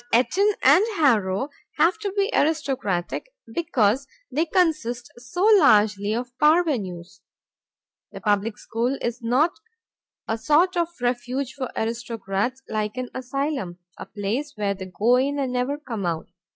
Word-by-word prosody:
But 235 +1 +4
Eton 405 +3 +3
and 295 +9 +7
Harrow 225 - +2 0.3
have 335 +7 +3
to 410 -2 -3
be 400 +3 +2
aristocratic 270 - 0 0.2
because 240 -2 +1 0.2
they 320 +3 0
consist 300 -10 0
so 245 +10 -4 0.2
largely 210 - +4
of 245 +1 -5
parvenues. 255 - +1 0.9
The - - -8
public 210 0 0
school 240 +4 -2
is 240 0 -3
not 255 +9 +2 0.8
a 225 0 -1
sort 335 +8 +3
of 340 -1 +1
refuge 250 +2 -1
for 260 -3 -4
aristocrats, 230 +1 -2
like 215 +1 -3
an 255 -1 -3
asylum, 260 - -3 0.2
a - - -9
place 225 +9 -3
where 205 -2 0
they 190 -1 -8
go 225 +7 +2
in 280 +3 0
and 265 -3 -1
never 250 +3 -1
come 230 - -4
out. 165 0 -3
245 Hz, 140 wpm, -24 LUFS, 215-295 Hz, 0.9 s, and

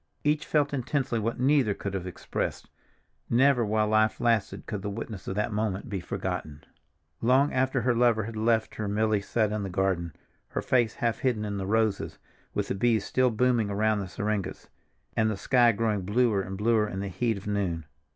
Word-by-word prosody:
Each 150 0 +1
felt 145 -1 +1
intensely 130 -2 -1
what 115 +2 -2
neither 130 -6 +3
could 100 - -5
have 95 -1 -3
expressed. 90 - -4 0.6
Never, 125 +1 +4
while 110 0 +1
life 110 0 +2
lasted, 115 -4 0
could 105 -4 -4
the 100 - -3
witness 105 -1 -6
of 95 - -3
that 105 +1 -1
moment 105 +2 -2
be 100 -2 -2
forgotten. 75 -4 -4 0.6
Long 130 +5 +3
after 130 0 +1
her 125 +1 +2
lover 120 -2 +3
had 110 +2 -6
left 110 0 +1
her 110 - -4
Milly 105 0 +1
sat 110 +1 0
in 105 0 -2
the 100 - -3
garden, 90 -3 -1 0.3
her - - -3
face 120 -4 +2
half 115 -2 -1
hidden 120 -5 0
in 100 -1 -3
the 95 -1 -3
roses, 110 -1 0 0.4
with - - -1
the - - +1
bees 110 +1 +1
still 130 -1 +2
booming 120 -2 +2
around 105 +1 +1
the 100 - -4
syringas, 100 +1 -3 0.5
and 110 -1 +2
the 105 - -2
sky 120 +2 +4
growing 110 -2 0
bluer 105 +1 +2
and 95 0 -6
bluer 110 0 +2
in 95 - -5
the 100 - -3
heat 115 +3 -1
of 95 - -10
noon. 95 -6 -1
110 Hz, 195 wpm, -28 LUFS, 100-120 Hz, 0.6 s, Never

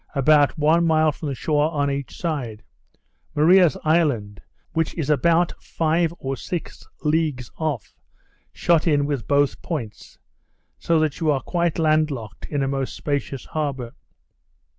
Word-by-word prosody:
about 145 +1 +4
one 155 +3 +3
mile 155 -1 +3
from 150 +1 -7
the 135 - -3
shore 150 +3 +1
on 145 -3 0
each 140 -1 -5
side; 135 -11 -3 0.7
Maria's 170 +1 +5
Island, 140 - +1 0.3
which 160 -1 -1
is 155 -3 -1
about 170 +4 +3
five 165 +1 0
or 135 0 -3
six 175 +4 -6 0.2
leagues 150 -6 0
off, 150 - -3 0.6
shut 170 -1 +2
in 145 -3 +3
with 140 -5 -3
both 145 0 +2
points; 120 -11 -6 0.6
so 165 -1 +2
that 155 -3 0
you 160 - +1
are 140 -3 +2
quite 170 -2 -1
land 155 -1 +3
locked 110 -7 -7
in 145 -2 -1
a - - 0
most 135 -1 -2
spacious 140 -3 -3
harbour. 135 -6 -3
150 Hz, 145 wpm, -23 LUFS, 135-160 Hz, 0.7 s, Maria's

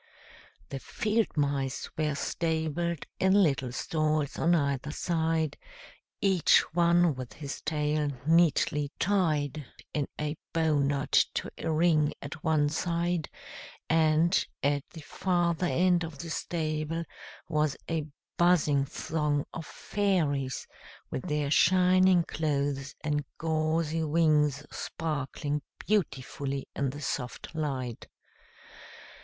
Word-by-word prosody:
The 135 - -4
field 215 - -1
mice 140 -2 0
were 155 -2 0
stabled 165 +1 -1
in 190 0 +4
little 140 -10 +3
stalls 155 +1 -1
on 170 +2 +4
either 140 -2 0
side, 160 -1 -1 0.6
each 190 -4 +5
one 170 -1 +4
with 130 -2 -7
his 140 -3 -6
tail 150 -1 0 0.2
neatly 155 -3 +3
tied 155 -7 +1 0.3
in 145 -2 0
a 150 0 -2 0.2
bow 160 -3 +2
knot 140 0 0 0.2
to - - -2
a 165 - -1
ring 155 -2 +3
at 145 +2 -8
one 155 -2 +3
side; 170 0 -1 0.6
and, 160 +2 +4 0.2
at 145 0 +2
the 160 - -10
farther 175 +2 0
end 175 0 +3
of 160 -3 -6
the 165 +2 -6
stable 160 0 -2 0.4
was 155 -3 0
a 160 -2 -2 0.3
buzzing 155 -5 +4
throng 150 0 -1
of 165 - -6
fairies, 155 -10 -1 0.5
with 130 - -4
their 150 -1 -1
shining 185 +1 +5
clothes 140 -3 -2
and 150 -1 0
gauzy 160 0 0
wings 150 -2 +2
sparkling 150 -1 -3 0.2
beautifully 140 -7 -2
in 140 -1 0
the 145 +3 -7
soft 125 +3 -4
light. 135 -7 -3
155 Hz, 115 wpm, -29 LUFS, 145-170 Hz, 0.6 s, each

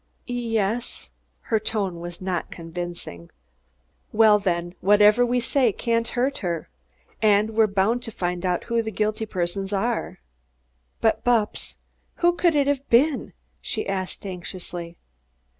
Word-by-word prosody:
"Ye 240 -2 -1
es." 220 +4 -2 0.3
Her 220 - 0
tone 200 -5 -2
was 175 +1 -8
not 185 -2 -2
convincing. 170 - -7 0.8
"Well, 215 -1 +6
then, 175 -3 -1
whatever 210 +4 +6
we 245 +1 +2
say 250 0 +2
can't 230 +2 0
hurt 260 +3 -1
her. 170 -4 -3 0.5
And 215 0 +4
we're 220 0 +4
bound 205 +4 +1
to 230 - -6
find 180 -2 -3
out 180 -2 0
who 235 -1 0
the 220 - -4
guilty 215 +1 -1
persons 190 +1 -2
are." 225 +4 -1 0.8
"But, 225 - +2
Bupps, 235 -4 +1 0.4
who 350 0 +3
could 345 -2 +2
it 285 -1 +4
have 280 -1 -1
been?" 275 +5 +3 0.3
she 215 - -3
asked 190 0 -3
anxiously. 175 -2 -6
210 Hz, 140 wpm, -24 LUFS, 180-235 Hz, 0.8 s, Well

